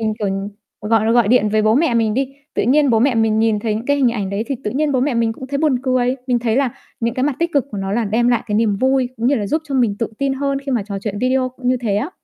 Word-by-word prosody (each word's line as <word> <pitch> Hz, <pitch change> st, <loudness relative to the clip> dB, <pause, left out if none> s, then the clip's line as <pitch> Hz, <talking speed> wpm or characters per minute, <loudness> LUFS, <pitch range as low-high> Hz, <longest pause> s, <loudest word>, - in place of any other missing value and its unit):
mình, 220 Hz, -1 st, 0 dB
kiểu, 210 Hz, -, -1 dB
ừm, 195 Hz, +1 st, -3 dB, 0.4 s
gọi 225 Hz, 0 st, +3 dB
gọi 235 Hz, -4 st, +3 dB
điện 235 Hz, -3 st, +4 dB
với 215 Hz, 0 st, +1 dB
bố 215 Hz, +1 st, +3 dB
mẹ 280 Hz, -4 st, +2 dB
mình 220 Hz, -2 st, +1 dB
đi, 265 Hz, 0 st, 0 dB, 0.3 s
tự -, -, +1 dB
nhiên 280 Hz, +2 st, +3 dB
bố 225 Hz, -, +3 dB
mẹ 255 Hz, +1 st, +2 dB
mình 220 Hz, -1 st, +2 dB
nhìn 220 Hz, -1 st, +2 dB
thấy 215 Hz, -1 st, -1 dB
những 225 Hz, +3 st, -5 dB
cái 285 Hz, 0 st, +2 dB
hình 265 Hz, -3 st, +3 dB
ảnh 205 Hz, -4 st, -3 dB
đấy 205 Hz, +3 st, -2 dB
thì 275 Hz, -, -2 dB
tự 210 Hz, -, -1 dB
nhiên 290 Hz, +2 st, 0 dB
bố 255 Hz, -, +1 dB
mẹ 265 Hz, -1 st, 0 dB
mình 230 Hz, -1 st, +1 dB
cũng 260 Hz, +3 st, -9 dB
thấy 280 Hz, +1 st, -3 dB
buồn 290 Hz, -5 st, +2 dB
cười. 255 Hz, -1 st, +1 dB
Mình 245 Hz, -2 st, +2 dB
thấy 230 Hz, 0 st, 0 dB
là 270 Hz, -3 st, +2 dB, 0.3 s
những 230 Hz, +1 st, -1 dB
cái 255 Hz, -, -2 dB
mặt 285 Hz, -3 st, -1 dB
tích 335 Hz, 0 st, -1 dB
cực 280 Hz, -3 st, +2 dB
của 205 Hz, -, -5 dB
nó 195 Hz, 0 st, -3 dB
là 230 Hz, +1 st, 0 dB
đem 230 Hz, +4 st, +1 dB
lại 240 Hz, -2 st, +2 dB
cái 210 Hz, -, -2 dB
niềm 215 Hz, -2 st, +2 dB
vui, 260 Hz, +1 st, +1 dB
cũng 235 Hz, +1 st, -1 dB
như 285 Hz, -, +3 dB
là 210 Hz, -6 st, -2 dB
giúp 310 Hz, +10 st, -1 dB
cho 275 Hz, -, -3 dB
mình 235 Hz, -6 st, +1 dB
tự 230 Hz, -, -1 dB
tin 275 Hz, -1 st, 0 dB
hơn 275 Hz, 0 st, -1 dB
khi 275 Hz, -1 st, -5 dB
mà 235 Hz, -, +1 dB
trò 200 Hz, -2 st, -4 dB
chuyện 205 Hz, 0 st, -4 dB
video 255 Hz, +2 st, +1 dB
cũng 255 Hz, 0 st, -5 dB
như 255 Hz, -, +3 dB
thế 220 Hz, -5 st, -1 dB
á. 275 Hz, -, -2 dB
240 Hz, 330 wpm, -19 LUFS, 220-265 Hz, 0.4 s, điện